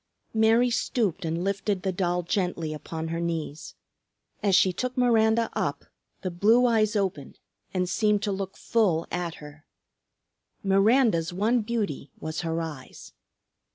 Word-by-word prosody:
Mary 225 Hz, +2 st, +4 dB
stooped 210 Hz, -6 st, 0 dB
and 165 Hz, +2 st, -2 dB
lifted 200 Hz, 0 st, -1 dB
the 190 Hz, -, 0 dB
doll 180 Hz, -1 st, -1 dB
gently 170 Hz, -3 st, -1 dB
upon 160 Hz, +1 st, -5 dB
her 165 Hz, 0 st, -2 dB
knees. 160 Hz, -3 st, -4 dB, 0.7 s
As 200 Hz, -3 st, +3 dB
she 185 Hz, 0 st, +4 dB
took 255 Hz, +7 st, -3 dB
Miranda 230 Hz, -2 st, +3 dB
up, -, -, -2 dB, 0.4 s
the 185 Hz, -, -2 dB
blue 220 Hz, +8 st, +4 dB
eyes 220 Hz, -2 st, +2 dB
opened 190 Hz, -9 st, -2 dB, 0.3 s
and 180 Hz, -1 st, 0 dB
seemed 210 Hz, +2 st, +1 dB
to 205 Hz, -, 0 dB
look 195 Hz, -1 st, -4 dB
full 185 Hz, -8 st, +1 dB
at 175 Hz, -2 st, -3 dB
her. 150 Hz, +1 st, -12 dB, 1.0 s
Miranda's 195 Hz, -2 st, +3 dB
one 220 Hz, +7 st, +1 dB
beauty 210 Hz, -, -3 dB
was 155 Hz, 0 st, -4 dB
her 165 Hz, -1 st, -2 dB
eyes. 150 Hz, -5 st, -9 dB
190 Hz, 140 wpm, -26 LUFS, 165-220 Hz, 1.0 s, Mary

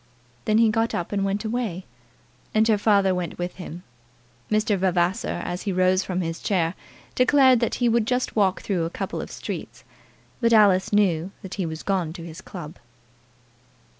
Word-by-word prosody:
Then 215 Hz, -, +3 dB
he 225 Hz, 0 st, +5 dB
got 225 Hz, +1 st, 0 dB
up 175 Hz, -, -3 dB
and 200 Hz, -1 st, 0 dB
went 195 Hz, +2 st, -1 dB
away, 220 Hz, -6 st, -3 dB, 0.7 s
and 220 Hz, +1 st, +4 dB
her 215 Hz, -2 st, +3 dB
father 200 Hz, -3 st, +3 dB
went 180 Hz, -2 st, -4 dB
with 175 Hz, 0 st, -4 dB
him. 180 Hz, -1 st, -8 dB, 0.7 s
Mr. 215 Hz, 0 st, +2 dB
Vavasor, 185 Hz, +2 st, 0 dB
as 175 Hz, +1 st, -4 dB
he 200 Hz, -, -2 dB
rose 185 Hz, +1 st, +2 dB
from 185 Hz, -1 st, -2 dB
his 165 Hz, -1 st, -3 dB
chair, 170 Hz, -4 st, 0 dB, 0.4 s
declared 260 Hz, -1 st, +5 dB
that 235 Hz, -, 0 dB
he 245 Hz, -, +1 dB
would 230 Hz, -1 st, +2 dB
just 250 Hz, +1 st, -1 dB
walk 195 Hz, -4 st, +2 dB
through 180 Hz, -5 st, -1 dB
a -, -, -2 dB
couple -, -, -4 dB
of -, -, -7 dB
streets; -, -, -7 dB, 0.6 s
but 230 Hz, -1 st, +3 dB
Alice 200 Hz, -4 st, +5 dB
knew 185 Hz, -5 st, +2 dB
that 190 Hz, -, -7 dB
he 185 Hz, -4 st, -2 dB
was 160 Hz, 0 st, -6 dB
gone 180 Hz, -5 st, -1 dB
to 170 Hz, -1 st, -9 dB
his 165 Hz, -1 st, -9 dB
club. 170 Hz, -6 st, -9 dB
195 Hz, 180 wpm, -24 LUFS, 175-220 Hz, 0.7 s, he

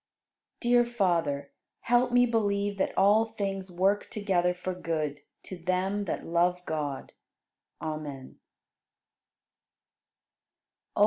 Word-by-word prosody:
66. 240 Hz, -, +1 dB, 0.2 s
Dear 240 Hz, -, -12 dB
Father, 165 Hz, -9 st, +1 dB, 0.3 s
help 245 Hz, +1 st, +3 dB
me 245 Hz, 0 st, +5 dB
believe 205 Hz, -3 st, 0 dB
that -, -, -1 dB
all 205 Hz, +3 st, +5 dB
things 195 Hz, -4 st, -4 dB
work 190 Hz, +3 st, +1 dB
together 190 Hz, -4 st, +1 dB
for 180 Hz, +1 st, -4 dB
good 155 Hz, -5 st, -3 dB, 0.2 s
to 185 Hz, -, -7 dB
them 190 Hz, +3 st, 0 dB
that 175 Hz, -, -3 dB
love 175 Hz, +2 st, +2 dB
God. 150 Hz, -3 st, -3 dB, 0.7 s
Amen. 150 Hz, -4 st, -6 dB
185 Hz, 105 wpm, -29 LUFS, 165-205 Hz, 0.7 s, me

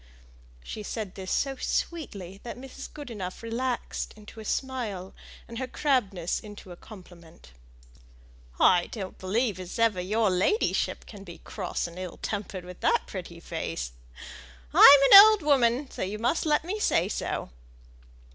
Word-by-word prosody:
She 215 Hz, -, -7 dB
said 210 Hz, -2 st, -5 dB
this 190 Hz, -1 st, -7 dB
so 270 Hz, -1 st, 0 dB
sweetly 200 Hz, -, -4 dB
that 240 Hz, -, -8 dB
Mrs. 265 Hz, +1 st, -10 dB
Goodenough 225 Hz, -10 st, -7 dB
relaxed 240 Hz, +2 st, -3 dB
into 215 Hz, +1 st, -13 dB
a 220 Hz, -, -9 dB
smile, 220 Hz, -8 st, -3 dB, 0.3 s
and 230 Hz, 0 st, -7 dB
her 260 Hz, -, -3 dB
crabbedness 205 Hz, -, 0 dB
into 205 Hz, -3 st, -12 dB
a -, -, -8 dB
compliment. 175 Hz, -, -15 dB, 1.1 s
"I 175 Hz, -1 st, +5 dB
don't 195 Hz, -5 st, -7 dB
believe 205 Hz, +1 st, -1 dB
as 180 Hz, -1 st, -7 dB
ever 225 Hz, -5 st, +2 dB
your 210 Hz, +2 st, +1 dB
ladyship 190 Hz, -, 0 dB
can 205 Hz, -3 st, -11 dB
be 170 Hz, -3 st, -11 dB
cross -, -, -4 dB
and 170 Hz, +1 st, -8 dB
ill 185 Hz, -2 st, -7 dB
tempered 200 Hz, -3 st, -5 dB
with 180 Hz, 0 st, -11 dB
that -, -, +2 dB
pretty 170 Hz, -3 st, -8 dB
face. 80 Hz, -, -5 dB, 0.8 s
I'm 280 Hz, 0 st, +10 dB
an 395 Hz, -, +14 dB
old 430 Hz, -4 st, +5 dB
woman, 270 Hz, -2 st, +2 dB
so -, -, -7 dB
you 195 Hz, +3 st, -3 dB
must 245 Hz, +9 st, 0 dB
let 300 Hz, +1 st, +2 dB
me 405 Hz, +5 st, -3 dB
say 180 Hz, -, +2 dB
so." 200 Hz, -, -4 dB
210 Hz, 150 wpm, -27 LUFS, 185-255 Hz, 1.1 s, an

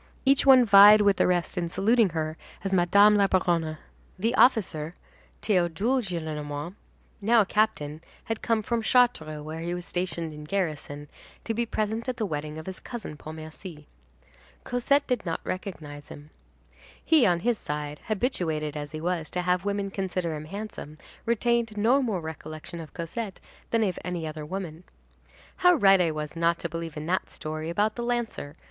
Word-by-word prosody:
Each 275 Hz, +1 st, +4 dB
one 260 Hz, -2 st, +8 dB
vied 205 Hz, 0 st, +9 dB
with 200 Hz, -2 st, +4 dB
the -, -, +3 dB
rest 180 Hz, +1 st, 0 dB
in 170 Hz, -1 st, -2 dB
saluting 215 Hz, +4 st, +3 dB
her 155 Hz, -1 st, -3 dB, 0.3 s
as 195 Hz, -1 st, -2 dB
Madame 200 Hz, +4 st, +5 dB
la 200 Hz, -1 st, +4 dB
Baronne. 170 Hz, -4 st, +1 dB, 0.4 s
The 225 Hz, +6 st, 0 dB
officer, 175 Hz, -, +3 dB, 0.5 s
Théodule 200 Hz, +6 st, +1 dB
Gillenormand, 155 Hz, -4 st, -5 dB, 0.5 s
now 225 Hz, +3 st, +5 dB
a -, -, +1 dB
captain, 175 Hz, -8 st, 0 dB, 0.2 s
had 225 Hz, -1 st, -4 dB
come 225 Hz, -2 st, +1 dB
from 235 Hz, +2 st, -1 dB
Chartres, 220 Hz, -, +2 dB
where 155 Hz, +1 st, -6 dB
he 170 Hz, +1 st, -3 dB
was 180 Hz, -1 st, -6 dB
stationed 170 Hz, -3 st, -3 dB
in 150 Hz, 0 st, -9 dB
garrison, 150 Hz, -5 st, -3 dB, 0.4 s
to 225 Hz, -, -2 dB
be 235 Hz, +1 st, -1 dB
present 220 Hz, +3 st, -2 dB
at 250 Hz, -, -3 dB
the 220 Hz, -, -1 dB
wedding 150 Hz, -3 st, -4 dB
of 160 Hz, -, -8 dB
his 190 Hz, 0 st, -5 dB
cousin 230 Hz, -10 st, -7 dB
Pontmercy. 155 Hz, +1 st, -9 dB, 0.8 s
Cosette 280 Hz, +4 st, +1 dB
did 250 Hz, -4 st, -1 dB
not 165 Hz, -3 st, -2 dB
recognize 150 Hz, -6 st, -6 dB
him. 145 Hz, +1 st, -12 dB, 0.7 s
He, 315 Hz, -8 st, +5 dB
on 175 Hz, -2 st, +2 dB
his 235 Hz, +1 st, +1 dB
side, 150 Hz, 0 st, -4 dB
habituated 165 Hz, -, -1 dB
as 145 Hz, 0 st, -6 dB
he 155 Hz, -, -5 dB
was 170 Hz, -2 st, -2 dB
to 180 Hz, -, -2 dB
have 180 Hz, +1 st, +1 dB
women 200 Hz, -1 st, -1 dB
consider 185 Hz, -4 st, -2 dB
him 150 Hz, 0 st, -7 dB
handsome, 195 Hz, -5 st, -7 dB, 0.3 s
retained 235 Hz, -1 st, +1 dB
no 240 Hz, +7 st, +4 dB
more 215 Hz, -9 st, -1 dB
recollection 160 Hz, +1 st, -8 dB
of 160 Hz, -2 st, -10 dB
Cosette 190 Hz, +4 st, -5 dB, 0.3 s
than 230 Hz, -1 st, +2 dB
of 190 Hz, -4 st, -1 dB
any 175 Hz, -2 st, -3 dB
other 155 Hz, -1 st, -6 dB
woman. 175 Hz, -2 st, -6 dB, 0.7 s
"How 360 Hz, -1 st, +5 dB
right 195 Hz, -, +5 dB
I 170 Hz, -, +2 dB
was 155 Hz, 0 st, -5 dB
not 170 Hz, 0 st, +2 dB
to 170 Hz, -, -5 dB
believe 165 Hz, -1 st, -6 dB
in 150 Hz, -, -5 dB
that 185 Hz, +3 st, -1 dB
story 155 Hz, 0 st, -5 dB
about 210 Hz, +5 st, +1 dB
the 240 Hz, -, -5 dB
lancer!" 235 Hz, -11 st, -3 dB
180 Hz, 175 wpm, -27 LUFS, 155-215 Hz, 0.8 s, vied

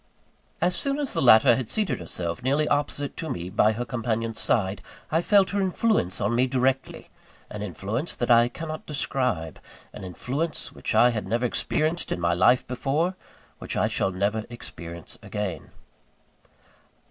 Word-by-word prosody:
As 180 Hz, +1 st, +2 dB
soon 275 Hz, +6 st, +1 dB
as 290 Hz, -3 st, -1 dB
the -, -, 0 dB
latter 115 Hz, -1 st, +7 dB
had 125 Hz, -3 st, -4 dB
seated 215 Hz, -, 0 dB
herself 85 Hz, +3 st, -4 dB
nearly 140 Hz, +4 st, +1 dB
opposite 145 Hz, -1 st, -1 dB
to 160 Hz, -3 st, -4 dB
me, 90 Hz, +1 st, -4 dB
by 110 Hz, +1 st, +3 dB
her 120 Hz, +3 st, -3 dB
companion's 115 Hz, -2 st, -2 dB
side, 100 Hz, -3 st, +1 dB, 0.3 s
I 160 Hz, +2 st, +3 dB
felt 200 Hz, +1 st, +4 dB
her 200 Hz, 0 st, 0 dB
influence 190 Hz, -, +1 dB
on 105 Hz, +3 st, 0 dB
me 125 Hz, +2 st, +3 dB
directly 130 Hz, +1 st, -1 dB, 0.4 s
an 105 Hz, -, -6 dB
influence 105 Hz, -, -3 dB
that 120 Hz, -, 0 dB
I 120 Hz, 0 st, +6 dB
cannot 155 Hz, +3 st, -7 dB
describe 130 Hz, -, -2 dB, 0.3 s
an -, -, -9 dB
influence 135 Hz, -, -3 dB
which -, -, -4 dB
I 125 Hz, +1 st, +6 dB
had 110 Hz, -2 st, -4 dB
never 120 Hz, +2 st, 0 dB
experienced 155 Hz, +7 st, 0 dB
in -, -, -1 dB
my 85 Hz, 0 st, +1 dB
life 95 Hz, +9 st, +4 dB
before, 145 Hz, +8 st, -1 dB, 0.4 s
which -, -, -5 dB
I -, -, +3 dB
shall -, -, 0 dB
never 100 Hz, +4 st, -1 dB
experience 85 Hz, -8 st, -8 dB
again. 105 Hz, -4 st, -4 dB
120 Hz, 160 wpm, -25 LUFS, 105-150 Hz, 0.4 s, latter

